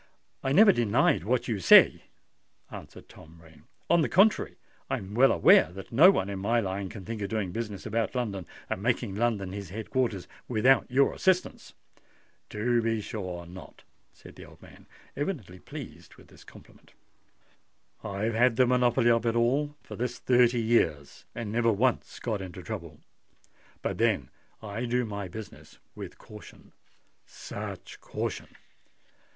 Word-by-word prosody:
"I 135 Hz, -, -2 dB
never 200 Hz, +7 st, +7 dB
denied 110 Hz, -, +1 dB
what 125 Hz, +3 st, 0 dB
you 110 Hz, -4 st, -2 dB
say," 90 Hz, -, +6 dB, 0.7 s
answered -, -, -11 dB
Tom 80 Hz, +1 st, -16 dB
Rain. 80 Hz, -1 st, -19 dB, 0.2 s
"On 170 Hz, -1 st, +4 dB
the -, -, 0 dB
contrary, 200 Hz, +4 st, +3 dB, 0.3 s
I -, -, 0 dB
am 95 Hz, +1 st, -9 dB
well 130 Hz, +4 st, +5 dB
aware 80 Hz, -, +5 dB
that 95 Hz, 0 st, -10 dB
no 150 Hz, +11 st, +7 dB
one 100 Hz, -, +1 dB
in 100 Hz, -1 st, -5 dB
my 115 Hz, +5 st, +1 dB
line 95 Hz, -2 st, -3 dB
can 100 Hz, -3 st, -10 dB
think 115 Hz, 0 st, -5 dB
of 100 Hz, -, -3 dB
doing 105 Hz, -4 st, -2 dB
business 105 Hz, -1 st, -5 dB
about 115 Hz, +3 st, -2 dB
London, 100 Hz, -8 st, -3 dB, 0.2 s
and 95 Hz, -, -4 dB
making 120 Hz, -2 st, -1 dB
London 105 Hz, -3 st, -1 dB
his 100 Hz, -3 st, -7 dB
head 110 Hz, +3 st, -7 dB
quarters, 115 Hz, -8 st, -1 dB, 0.2 s
without 125 Hz, +4 st, +3 dB
your 135 Hz, +2 st, +3 dB
assistance." 185 Hz, -1 st, -1 dB, 0.7 s
"To 120 Hz, +3 st, 0 dB
be 115 Hz, -1 st, 0 dB
sure 95 Hz, -5 st, -6 dB
not!" 90 Hz, +2 st, -13 dB, 0.3 s
said -, -, -16 dB
the -, -, -11 dB
old -, -, -16 dB
man, -, -, -17 dB, 0.3 s
evidently 135 Hz, -, -4 dB
pleased -, -, -11 dB
by -, -, -16 dB
this -, -, -18 dB
compliment. -, -, -18 dB, 1.1 s
"I've 105 Hz, +2 st, -2 dB
had 120 Hz, +1 st, +3 dB
the 130 Hz, -, +4 dB
monopoly 125 Hz, -1 st, +3 dB
of 115 Hz, 0 st, +1 dB
it 115 Hz, -, +1 dB
all 140 Hz, +5 st, +1 dB
for -, -, -9 dB
this 120 Hz, 0 st, -3 dB
thirty 120 Hz, -1 st, +3 dB
years, 80 Hz, -11 st, 0 dB
and 110 Hz, -3 st, -5 dB
never 115 Hz, 0 st, +2 dB
once 120 Hz, +4 st, 0 dB
got 110 Hz, -5 st, -3 dB
into 90 Hz, -1 st, -8 dB
trouble. 85 Hz, -2 st, -7 dB, 0.8 s
But -, -, -3 dB
then -, -, +1 dB, 0.3 s
I 110 Hz, +3 st, -4 dB
do 125 Hz, +1 st, 0 dB
my 100 Hz, -3 st, -5 dB
business 105 Hz, +3 st, -11 dB, 0.2 s
with -, -, -9 dB
caution—such 105 Hz, -1 st, -12 dB
caution! -, -, -5 dB
110 Hz, 155 wpm, -28 LUFS, 100-125 Hz, 1.1 s, never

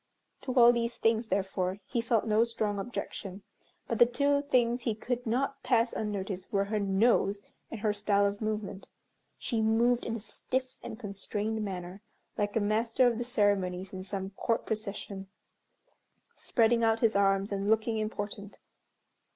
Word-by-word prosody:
To 255 Hz, -, -4 dB
all 240 Hz, -1 st, +8 dB
these 235 Hz, 0 st, -2 dB
things, 225 Hz, 0 st, +1 dB
therefore, 190 Hz, -1 st, -1 dB
he 235 Hz, -, -1 dB
felt 230 Hz, -1 st, +1 dB
no 220 Hz, 0 st, +4 dB
strong 215 Hz, -3 st, -2 dB
objection; 195 Hz, -3 st, -6 dB, 0.4 s
but 230 Hz, -, -2 dB
the 240 Hz, -, +8 dB
two 285 Hz, +3 st, +2 dB
things 245 Hz, -3 st, +1 dB
he 230 Hz, -2 st, -1 dB
could 245 Hz, +2 st, -3 dB
not 275 Hz, +4 st, -1 dB
pass 235 Hz, -2 st, +2 dB
unnoticed 195 Hz, -3 st, -4 dB
were 200 Hz, -1 st, +1 dB
her 210 Hz, +1 st, -1 dB
nose, 200 Hz, 0 st, +2 dB, 0.3 s
and 230 Hz, -, -7 dB
her 210 Hz, -1 st, +1 dB
style 205 Hz, -1 st, +2 dB
of 200 Hz, +1 st, -2 dB
movement. 215 Hz, -3 st, -3 dB, 0.5 s
She 230 Hz, -3 st, -1 dB
moved 235 Hz, +2 st, +3 dB
in 230 Hz, -, -3 dB
a -, -, -4 dB
stiff 255 Hz, +4 st, -4 dB
and 220 Hz, -, -7 dB
constrained 210 Hz, +1 st, -3 dB
manner, 185 Hz, -1 st, -6 dB, 0.3 s
like 205 Hz, -1 st, -1 dB
a -, -, +3 dB
master 225 Hz, +4 st, +2 dB
of 240 Hz, -2 st, +2 dB
the -, -, -1 dB
ceremonies 200 Hz, -6 st, 0 dB
in 185 Hz, 0 st, -5 dB
some 195 Hz, 0 st, -4 dB
Court 225 Hz, +3 st, -1 dB
procession, 205 Hz, -2 st, -4 dB, 1.1 s
spreading 230 Hz, -1 st, +2 dB
out 225 Hz, 0 st, +2 dB
his 225 Hz, -3 st, +3 dB
arms 195 Hz, 0 st, +2 dB
and 200 Hz, 0 st, -1 dB
looking 220 Hz, +1 st, +2 dB
important. 205 Hz, -1 st, -5 dB
215 Hz, 160 wpm, -30 LUFS, 200-235 Hz, 1.1 s, all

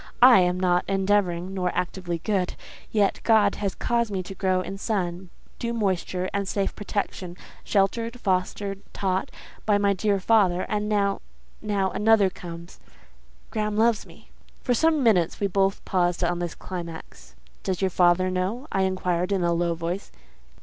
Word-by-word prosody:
I 250 Hz, -4 st, +9 dB
am 180 Hz, 0 st, +2 dB
not 180 Hz, -1 st, +2 dB
endeavouring, 195 Hz, -2 st, +1 dB
nor 180 Hz, -2 st, 0 dB
actively 180 Hz, -1 st, -2 dB
good, 185 Hz, +1 st, -1 dB, 0.4 s
yet 205 Hz, -3 st, +2 dB
God 215 Hz, -3 st, +4 dB
has 200 Hz, -2 st, -2 dB
caused 235 Hz, -1 st, 0 dB
me 190 Hz, -2 st, -2 dB
to 185 Hz, -, -8 dB
grow 185 Hz, -1 st, +1 dB
in 195 Hz, +2 st, -6 dB
sun, 185 Hz, -4 st, -2 dB, 0.3 s
due 235 Hz, -1 st, -2 dB
moisture, 185 Hz, -4 st, -1 dB
and 200 Hz, -1 st, -1 dB
safe 195 Hz, 0 st, -1 dB
protection, 195 Hz, -4 st, -4 dB, 0.3 s
sheltered, 230 Hz, +5 st, 0 dB
fostered, 195 Hz, 0 st, -1 dB
taught, 190 Hz, -1 st, -1 dB, 0.3 s
by 210 Hz, -2 st, +3 dB
my 200 Hz, 0 st, +2 dB
dear 200 Hz, +1 st, +1 dB
father; 185 Hz, -3 st, +3 dB
and 210 Hz, 0 st, -1 dB
now—now—another 205 Hz, 0 st, 0 dB
comes. 170 Hz, 0 st, -10 dB, 0.7 s
Graham 210 Hz, -2 st, -1 dB
loves 225 Hz, -1 st, +2 dB
me." -, -, -18 dB, 0.3 s
For 250 Hz, -, +2 dB
some 315 Hz, +2 st, +2 dB
minutes 180 Hz, -8 st, +3 dB
we 205 Hz, -, +1 dB
both 195 Hz, 0 st, 0 dB
paused 175 Hz, -1 st, +1 dB
on 175 Hz, 0 st, 0 dB
this 175 Hz, -1 st, -3 dB
climax. 170 Hz, -3 st, -8 dB, 0.3 s
"Does 190 Hz, -2 st, -2 dB
your 190 Hz, -1 st, +1 dB
father 180 Hz, +1 st, +3 dB
know?" 195 Hz, +10 st, -2 dB
I 195 Hz, -, +1 dB
inquired, 180 Hz, -1 st, -1 dB
in 190 Hz, -3 st, +1 dB
a 170 Hz, 0 st, +2 dB
low 170 Hz, 0 st, 0 dB
voice. 170 Hz, +4 st, -4 dB
190 Hz, 155 wpm, -25 LUFS, 180-210 Hz, 0.7 s, I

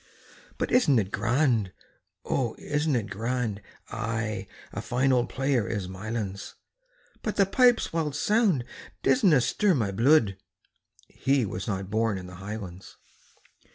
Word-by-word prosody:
"But -, -, -2 dB
isn't 200 Hz, -, +4 dB
it 100 Hz, -3 st, 0 dB
grand? 115 Hz, -3 st, +1 dB, 0.5 s
O, 120 Hz, -4 st, -1 dB
isn't 150 Hz, -1 st, 0 dB
it 105 Hz, -4 st, -2 dB
grand?" 115 Hz, 0 st, -2 dB, 0.3 s
"Ay, 110 Hz, -3 st, -3 dB, 0.3 s
a -, -, -4 dB
fine 130 Hz, +2 st, +1 dB
auld 125 Hz, -1 st, +2 dB
player 135 Hz, -5 st, 0 dB
is 100 Hz, -5 st, -3 dB
Mylands, 100 Hz, +1 st, -5 dB, 0.7 s
But 215 Hz, -, -3 dB
the 200 Hz, -, +4 dB
pipes' 245 Hz, +1 st, +3 dB
wild 155 Hz, -4 st, -1 dB
sound 200 Hz, -, +2 dB, 0.4 s
disna 185 Hz, -, +4 dB
stir 205 Hz, -, +2 dB
my 110 Hz, -7 st, 0 dB
bluid" 115 Hz, -2 st, +3 dB, 0.7 s
He 135 Hz, -3 st, +1 dB
was 95 Hz, -1 st, -5 dB
not 95 Hz, -2 st, -3 dB
born 110 Hz, -2 st, +1 dB
in 90 Hz, -, -7 dB
the 90 Hz, 0 st, -10 dB
highlands. 100 Hz, -3 st, -8 dB
115 Hz, 135 wpm, -27 LUFS, 100-145 Hz, 0.7 s, isn't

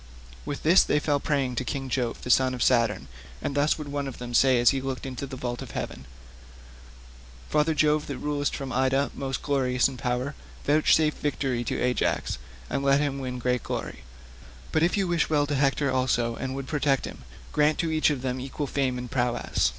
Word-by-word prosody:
With 145 Hz, -, -4 dB
this 170 Hz, +5 st, +7 dB
they -, -, +2 dB
fell 145 Hz, -1 st, +1 dB
praying 135 Hz, -4 st, -1 dB
to -, -, 0 dB
King 135 Hz, +1 st, -3 dB
Jove 125 Hz, -2 st, -2 dB
the 125 Hz, -, 0 dB
son 130 Hz, 0 st, +4 dB
of 125 Hz, -, 0 dB
Saturn, 115 Hz, -4 st, +2 dB, 0.3 s
and -, -, -3 dB
thus 145 Hz, +2 st, +2 dB
would 150 Hz, -2 st, -6 dB
one 145 Hz, -1 st, -2 dB
of 135 Hz, -, -7 dB
them 120 Hz, -1 st, -7 dB
say 130 Hz, 0 st, +5 dB
as 120 Hz, -, +6 dB
he 135 Hz, -, -1 dB
looked 135 Hz, 0 st, -4 dB
into 135 Hz, +1 st, -5 dB
the 135 Hz, -, -7 dB
vault 120 Hz, -1 st, -4 dB
of -, -, -7 dB
heaven, 65 Hz, -, -5 dB, 1.5 s
"Father 150 Hz, +1 st, +2 dB
Jove 150 Hz, 0 st, +2 dB
that 140 Hz, -, -4 dB
rulest 145 Hz, 0 st, -1 dB
from 135 Hz, -2 st, -5 dB
Ida, 130 Hz, +2 st, +2 dB
most 135 Hz, -1 st, -4 dB
glorious 130 Hz, -3 st, +2 dB
in 135 Hz, -2 st, -7 dB
power, 125 Hz, +2 st, -2 dB, 0.3 s
vouchsafe 155 Hz, +1 st, +4 dB
victory 135 Hz, -4 st, -1 dB
to -, -, -2 dB
Ajax, 125 Hz, 0 st, 0 dB, 0.3 s
and 135 Hz, -, -2 dB
let 140 Hz, 0 st, +4 dB
him 140 Hz, -2 st, -1 dB
win 125 Hz, -1 st, -4 dB
great 125 Hz, 0 st, 0 dB
glory: -, -, -5 dB, 0.7 s
but 155 Hz, -, +2 dB
if 175 Hz, +5 st, +2 dB
you 195 Hz, -2 st, +1 dB
wish 170 Hz, -1 st, +1 dB
well 145 Hz, -2 st, +3 dB
to 145 Hz, -, -3 dB
Hector 140 Hz, 0 st, +2 dB
also 120 Hz, -2 st, +1 dB
and 130 Hz, +1 st, -4 dB
would 135 Hz, -1 st, -4 dB
protect 140 Hz, -2 st, +1 dB
him, -, -, -8 dB, 0.3 s
grant 150 Hz, +1 st, +3 dB
to 165 Hz, -1 st, 0 dB
each 155 Hz, 0 st, +3 dB
of 140 Hz, -4 st, -2 dB
them 130 Hz, 0 st, -2 dB
equal 135 Hz, +3 st, -4 dB
fame 135 Hz, -2 st, -1 dB
and 125 Hz, -1 st, -6 dB
prowess." 120 Hz, -, +1 dB
135 Hz, 205 wpm, -26 LUFS, 125-145 Hz, 1.5 s, this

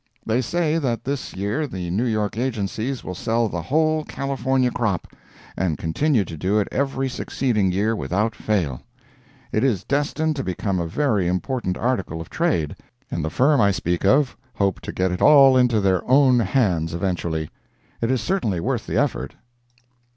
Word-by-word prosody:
They 115 Hz, +3 st, +1 dB
say 165 Hz, +4 st, 0 dB
that 125 Hz, -6 st, -2 dB
this 140 Hz, 0 st, -4 dB
year 105 Hz, +11 st, -1 dB
the 90 Hz, -7 st, -5 dB
New 110 Hz, +7 st, 0 dB
York 105 Hz, -3 st, -1 dB
agencies 120 Hz, +1 st, -2 dB
will 90 Hz, -, -5 dB
sell 115 Hz, +5 st, 0 dB
the 85 Hz, -4 st, -4 dB
whole 155 Hz, -, +1 dB
California 135 Hz, -3 st, -1 dB
crop, 105 Hz, -8 st, -1 dB, 0.5 s
and 85 Hz, -4 st, -1 dB
continue 110 Hz, -, +1 dB
to 85 Hz, -, -7 dB
do 95 Hz, +7 st, 0 dB
it 105 Hz, -, +1 dB
every 135 Hz, 0 st, -1 dB
succeeding 120 Hz, -6 st, 0 dB
year 105 Hz, +5 st, +1 dB
without 105 Hz, +2 st, -1 dB
fail. 85 Hz, -, -1 dB, 0.7 s
It 110 Hz, -, +1 dB
is 110 Hz, -9 st, +1 dB
destined 150 Hz, +2 st, 0 dB
to 135 Hz, -, -2 dB
become 95 Hz, 0 st, -2 dB
a 85 Hz, -, -2 dB
very 105 Hz, -, +1 dB
important 90 Hz, +2 st, -1 dB
article 100 Hz, -10 st, -1 dB
of 80 Hz, -, -9 dB
trade, 150 Hz, -, 0 dB, 0.4 s
and 85 Hz, -, -2 dB
the 80 Hz, -, -1 dB
firm 135 Hz, -, +3 dB
I 100 Hz, -, +5 dB
speak 90 Hz, -3 st, -1 dB
of 135 Hz, +7 st, +3 dB, 0.2 s
hope 100 Hz, -2 st, 0 dB
to -, -, -6 dB
get 95 Hz, 0 st, 0 dB
it 90 Hz, -, -3 dB
all 135 Hz, -3 st, +7 dB
into 125 Hz, -3 st, +4 dB
their 95 Hz, -2 st, +2 dB
own 130 Hz, -2 st, +5 dB
hands 90 Hz, -8 st, +1 dB
eventually. 85 Hz, -4 st, -2 dB, 0.5 s
It 115 Hz, -, 0 dB
is 130 Hz, -2 st, +1 dB
certainly 145 Hz, -, -1 dB
worth -, -, -2 dB
the -, -, -1 dB
effort. 65 Hz, +2 st, -1 dB
110 Hz, 175 wpm, -22 LUFS, 90-135 Hz, 0.7 s, all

